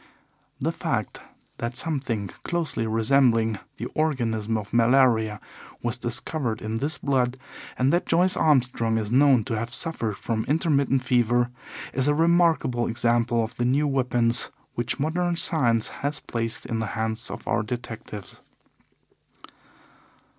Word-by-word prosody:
The - - 0
fact - - -3 0.4
that 120 +1 -3
something 130 -10 -1
closely 145 -10 -2
resembling 115 -1 +2 0.2
the 115 - -4
organism 115 -8 0
of 105 -2 -7
malaria 115 -3 +3 0.4
was 120 0 -2
discovered 120 0 -2
in 110 +1 -3
this 145 +5 -1
blood, 130 -3 0 0.4
and 130 +4 +2
that 175 - +1
Joyce 180 +2 +3
Armstrong 125 -6 +2
is 110 -1 -3
known 130 -2 +5
to 115 - -3
have 115 +2 -4
suffered 120 -6 -1
from 110 -1 -2
intermittent 140 -4 +1
fever, 120 -1 +2 0.4
is 130 +1 0
a 145 - +3
remarkable 165 -7 +2
example 115 0 +1
of 110 - -6
the 120 - 0
new 140 +4 +2
weapons 125 -3 +2 0.2
which 120 +4 -2
modern 175 +4 0
science 120 -10 +2
has 145 +1 -3
placed 115 -1 -3
in 115 - -2
the 110 - -2
hands 110 +1 -2
of - - -8
our 105 - +1
detectives. 110 -3 -7
120 Hz, 135 wpm, -25 LUFS, 115-140 Hz, 0.4 s, known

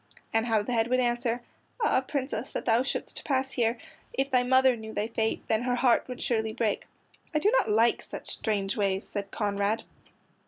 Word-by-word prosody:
And 225 +1 +2
how 220 -3 +2
the 245 - -3
head 225 -1 +2
would 255 +1 +2
answer: 240 -1 0 0.4
"Ah, 445 - +3
Princess 265 -1 -3
that - - -3
thou 230 0 +4
shouldst 265 - -4
pass 265 -2 0
here! 235 -1 +1 0.4
If 270 +1 -1
thy 250 -1 +4
mother 260 0 +4
knew 220 -1 -8
thy 205 - 0
fate, 225 -1 -1
Then 220 0 +2
her 245 0 0
heart 245 -1 +3
would 250 -1 -6
surely 220 -2 0
break." 220 -2 -1 0.5
"I - - +5
do 400 +8 +3
not - - +3
like 225 +3 +3
such - - -7
strange 200 -3 -1
ways," 195 -1 0
said 200 -1 -4
Conrad. 205 0 0
235 Hz, 195 wpm, -28 LUFS, 220-255 Hz, 0.5 s, I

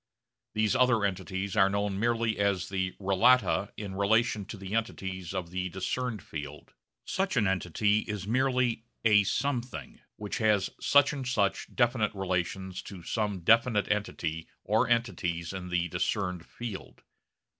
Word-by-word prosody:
These 110 -1 +2
other 125 -5 +4
entities 95 +1 -3
are 95 -2 +5
known 100 0 -1
merely 115 -1 +1
as 100 -3 +1
the 95 -1 -1
relata 100 +1 +3
in 100 -3 -5
relation 105 +1 +2
to 105 - -8
the 95 +1 -7
entities 95 -5 -3
of 90 -3 -4
the 90 0 -2
discerned 105 +3 -3
field. 75 -7 -8 0.3
Such 190 -6 -1
an 110 - +4
entity 95 +3 +1
is 105 -3 -4
merely 125 0 +1 0.2
a 105 -2 +6
'something' 125 +3 -2 0.2
which 105 -1 -4
has 105 -3 +2
such 145 0 +4
and 135 -3 -4
such 100 -6 0
definite 120 -4 +2
relations 95 0 -2
to 95 -4 -10
some 105 -2 -2
definite 115 +2 +3
entity 80 -6 -2 0.2
or 110 +3 +2
entities 90 -8 0
in 90 -1 -6
the 90 0 0
discerned 90 0 -2
field. 115 -5 -8
100 Hz, 145 wpm, -29 LUFS, 95-115 Hz, 0.3 s, a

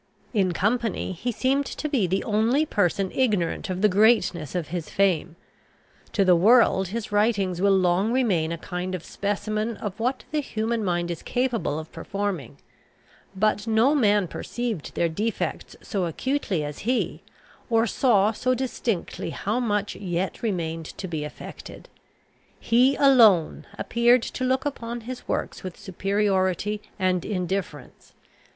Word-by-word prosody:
In 195 -5 +2
company 215 +4 0
he 220 +8 -3
seemed 270 +4 0
to 305 - -4
be 260 -11 +1
the 190 +3 0
only 230 +8 +2
person 195 - 0
ignorant 205 -10 0
of 185 +2 -3
the - - +7
greatness 190 - +2
of 170 -4 -2
his 170 -2 -4
fame. 180 -4 +1 0.8
To 195 - +3
the 180 -1 +6
world 195 0 +5
his 215 +3 -5
writings 205 -4 +1
will 200 -1 +4
long 185 +4 +2
remain 195 -11 +1
a 170 - -3
kind 180 +2 -4
of 175 - -7
specimen 215 +2 -2
of 205 0 -6
what 250 +4 -1
the 305 - +1
human 225 -4 -2
mind 175 -2 -1
is 170 - -5
capable 245 - -1
of 155 0 -7
performing; 180 - -4 0.8
but 210 +2 +1
no 225 +6 +4
man 210 -8 +3
perceived 230 -3 -4
their 170 - +2
defects 210 +7 -3
so 195 -4 -2
acutely 195 - -1
as 145 0 -6
he, 245 +3 -1 0.5
or 225 -1 +3
saw 215 -3 +3
so 255 +3 0
distinctly 240 -6 -3
how 215 +5 -2
much 210 -4 -1
yet 185 -1 -3
remained 165 -7 -2
to 190 - -5
be 160 -4 -3
effected: 150 - -10 0.7
he 250 +4 +3
alone 225 - +5
appeared 235 +1 +3
to - - -4
look 260 +2 +1
upon 240 -4 -4
his 250 +2 -8
works - - -3
with 185 -2 -7
superiority 195 +1 0 0.2
and 185 -3 +1
indifference. 180 - -4
205 Hz, 145 wpm, -25 LUFS, 180-235 Hz, 0.8 s, the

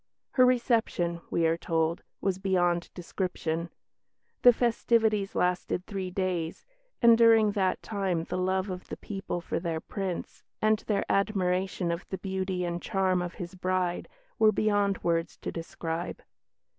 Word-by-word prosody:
"Her 255 -1 +5
reception," 225 -9 +1
we 165 - +1
are 165 +1 +2
told, 165 0 0 0.2
"was 190 -1 0
beyond 175 -3 +1
description. 170 -2 -3 0.7
The 245 - +9
festivities 225 -3 +1
lasted 180 0 0
three 195 -3 -4
days, 180 -3 -2 0.4
and 235 -1 +8
during 225 -2 +6
that 190 -3 0
time 190 -6 -1
the - - -5
love 190 +1 0
of 180 0 -7
the - - -6
people 195 -3 -4
for - - -2
their 165 -2 -2
Prince, 190 0 -5 0.2
and 215 0 +3
their 200 -2 +1
admiration 190 -3 0
of 170 +2 -3
the 190 - -3
beauty 190 -1 -2
and 175 0 -3
charm 190 -3 +1
of 175 -1 -5
his 175 +1 -7
bride, 185 -1 -1 0.3
were 220 -1 +6
beyond 205 -2 +1
words 165 -1 0
to - - -5
describe." 165 0 -5
185 Hz, 145 wpm, -28 LUFS, 175-205 Hz, 0.7 s, The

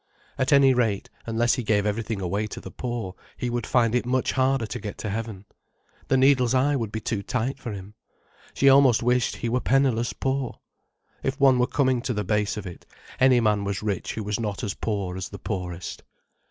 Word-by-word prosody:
At 130 +2 0
any 140 -2 +6
rate, 115 -5 0 0.2
unless 115 +1 +2
he 130 - -1
gave 105 -2 +1
everything 105 0 -2
away 100 +4 -1
to - - -7
the - - -9
poor, 120 -7 -4 0.2
he 125 - -2
would 120 -2 -2
find 115 -3 +2
it 125 - +2
much 130 +1 0
harder 130 -2 +1
to 125 +3 -5
get 105 -1 -6
to 105 - -4
heaven. 110 -2 -5 0.6
The 135 - +3
needle's 130 -2 +4
eye 140 +3 +3
would 115 -6 -2
be 110 - -3
too 110 -1 -2
tight 125 +6 -2
for 120 - -5
him. 100 0 -8 0.6
She 140 - +3
almost 135 -4 +6
wished 125 0 +2
he 120 - -4
were 125 +2 +1
penniless 130 -3 +2
poor. 135 -1 -2 0.6
If 135 +2 -2
one 135 -2 +5
were 125 - +3
coming 130 -4 +1
to 125 -1 -2
the 105 - -1
base 105 +2 0
of 105 - -5
it, 90 -2 -10 0.3
any 130 -1 +5
man 105 -2 +2
was 100 0 -3
rich 100 -4 -2
who 110 - -3
was 105 +1 -2
not 105 -3 -3
as 100 - -1
poor 100 -5 -3
as 95 - -5
the 100 - -8
poorest. 90 -4 -5
115 Hz, 210 wpm, -25 LUFS, 105-130 Hz, 0.6 s, any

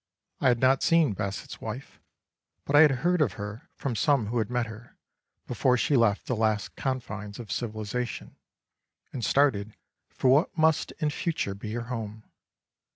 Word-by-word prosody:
I - - +2
had 120 -2 +4
not 130 +1 +4
seen 165 - +4
Basset's 100 -1 -5
wife, - - -7 0.7
but 140 - 0
I 145 - +9
had 155 - +8 0.2
heard 180 -1 +3
of 120 -11 +2
her 105 +3 -7
from 130 -4 -3
some 140 -1 +2
who 115 +3 -1
had 110 - -1
met 125 -1 0
her, 110 +2 -12 0.5
before 125 -1 +2
she 145 +4 +1
left 115 -5 +3
the 125 - -1
last 110 -1 0
confines 105 -6 -4
of 115 -5 -8
civilisation 110 +3 -4 0.8
and 125 - -4
started 110 -8 +2 0.3
for 130 - +2
what 150 +5 +3
must 160 -1 +2
in 155 -3 -1
future 150 - -2
be 105 +2 -7
her 120 0 -3
home. 110 -3 -6
120 Hz, 165 wpm, -27 LUFS, 105-140 Hz, 0.8 s, I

